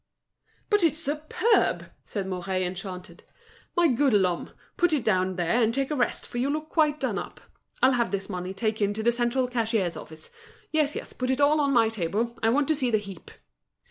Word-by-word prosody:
"But 415 -1 +4
it's 320 -3 +2
superb!" 310 - +1
said 200 -3 -4
Mouret, 185 0 -2
enchanted. 180 0 -7 0.5
"My 345 -1 +5
good 270 -1 +2
Lhomme, 185 -4 +1 0.3
put 350 -4 +2
it 285 -6 +1
down 185 -3 +1
there, 180 +7 +1
and 225 -1 +3
take 270 +3 -1
a - - 0
rest, 245 -3 0
for 240 - -5
you 265 +3 +1
look 310 +1 -3
quite 305 -2 +2
done - - -1
up. - - -8 0.4
I'll 260 - +7
have 245 -2 +1
this 195 -1 -3
money 185 -2 -4
taken 210 -1 0
to 220 - -3
the 235 - +4
central 240 +2 0
cashier's 225 -7 0
office. 160 0 -11 0.4
Yes, 305 -2 +1
yes, - - -6
put 255 0 -3
it 260 +1 +1
all 295 +1 +4
on 280 -1 +2
my 230 -4 +4
table, 220 +3 -2
I 225 - +3
want 275 +4 +2
to 315 - +3
see 260 -4 0
the 220 - +3
heap." 200 -4 -9
235 Hz, 205 wpm, -26 LUFS, 195-285 Hz, 0.5 s, I'll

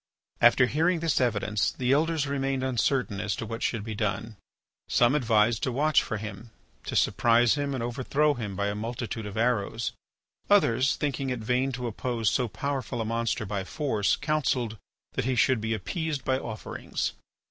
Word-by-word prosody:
After 120 +2 +6
hearing 165 +7 +1
this 160 -4 +1
evidence 105 -3 +1
the 125 0 0
Elders 155 +1 +2
remained 135 -1 -1
uncertain 125 -4 0
as 105 - -1
to - - -5
what 115 +1 -5
should 115 -4 -1
be 110 0 -5
done. 110 +1 -2 0.5
Some 120 +2 +4
advised 115 -5 +3
to 130 - 0
watch 150 +4 +3
for 110 - -3
him, 110 +2 -7 0.4
to - - -4
surprise 120 0 +4
him 145 -1 -1
and 120 - -3
overthrow 135 +5 +1
him 110 -7 -5
by 100 +1 -1
a - - -2
multitude 115 0 -4
of 100 +1 -7
arrows. 115 -1 0 0.6
Others, 145 - +4
thinking 140 -2 -2
it 125 -2 -3
vain 125 +4 +1
to 125 0 -4
oppose 115 -1 -1
so 125 -2 +1
powerful 130 0 -3
a 115 - -1
monster 115 +1 -1
by 100 -1 -3
force, 110 - 0
counselled 130 -7 0 0.4
that - - -1
he 130 0 +1
should 125 -1 +3
be 110 0 -1
appeased 155 - -3
by 130 0 +1
offerings. 110 -5 -4
120 Hz, 175 wpm, -27 LUFS, 110-135 Hz, 0.6 s, After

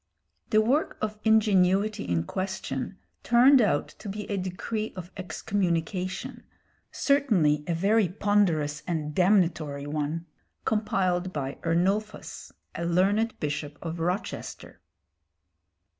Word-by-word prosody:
The 215 -1 +4
work 265 +8 +1
of 215 0 -3
ingenuity 210 -2 +3
in 85 -2 0
question 185 - -4 0.2
turned 250 +3 +6
out 200 -9 +1
to 205 - -7
be 210 +2 -4
a - - +1
decree 200 +4 -3
of 180 -1 -8
excommunication, 185 -1 -2 0.5
certainly 200 - +2
a 170 - 0
very 200 +3 +3
ponderous 175 -7 +1
and 155 -4 -2
damnatory 170 -6 +2
one, 150 +3 -3 0.4
compiled 185 -4 0
by 140 -4 -4
Ernulphus, 195 +6 -1 0.2
a 170 - -4
learned 195 +6 +1
bishop 145 0 -3
of 165 0 -4
Rochester. 180 +6 -4
185 Hz, 110 wpm, -27 LUFS, 165-210 Hz, 0.5 s, turned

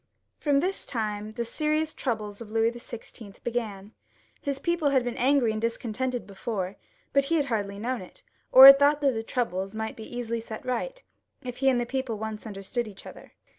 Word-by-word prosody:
From 285 -2 +2
this 380 +3 -1
time 215 -3 -3
the 235 +2 -4
serious 305 +5 -1
troubles 215 -4 -3
of 225 - -8
Louis 225 +1 +2
XVI. 235 -3 -10
began. 220 -4 -4 0.5
His 280 -1 -2
people 340 0 +1
had 265 -3 +3
been 245 -1 -3
angry 260 -2 +3
and 215 0 -3
discontented 235 +2 -2
be 200 - -13
fore, 195 -1 -3 0.4
but 275 0 +4
he 330 +4 +1
had 295 -3 +2
hardly 205 -6 -2
known 240 +3 -2
it, 185 - -14 0.3
or 260 +1 +11
had 275 0 +12
thought 290 +1 +4
that 280 -2 +4
the 225 - -2
troubles 195 -4 -2
might 220 +1 -4
easily 235 +1 -4
be - - -7
set 220 -1 -8
right, - - -3 0.4
if 250 -1 -6
he 270 0 +3
and 250 -2 +2
the 240 - -1
people 260 -3 -3
once 220 +1 -5
understood 215 +4 -3
each 200 -2 -12
other. - - -12
235 Hz, 200 wpm, -27 LUFS, 215-270 Hz, 0.5 s, had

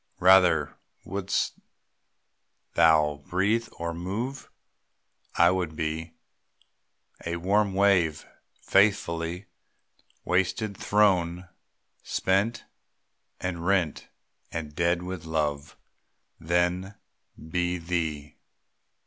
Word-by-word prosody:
Rather 90 -5 +4 0.3
(wouldst 100 +1 -2 1.1
thou 75 -3 +4
breathe 105 +6 +1
or 85 0 -4
move?) 105 +11 -5 0.9
I 85 +1 +5
would 90 -4 -2
be 80 +1 -3 1.1
A 85 0 -3
warm 100 +3 +1
wave, 95 -6 +2 0.4
faithful, 90 -4 +2 0.8
wasted, 95 +3 0
thrown, 90 -4 +1 0.5
Spent 105 +5 0 0.7
and 85 -2 -4
rent 90 -4 0 0.4
and 75 -2 -5
dead 85 +2 +1
with 90 -2 -6
love, 75 -2 -2 0.6
Than 90 +4 0 0.4
be 90 +2 -2
thee. 80 -4 -3
90 Hz, 80 wpm, -27 LUFS, 80-95 Hz, 1.1 s, I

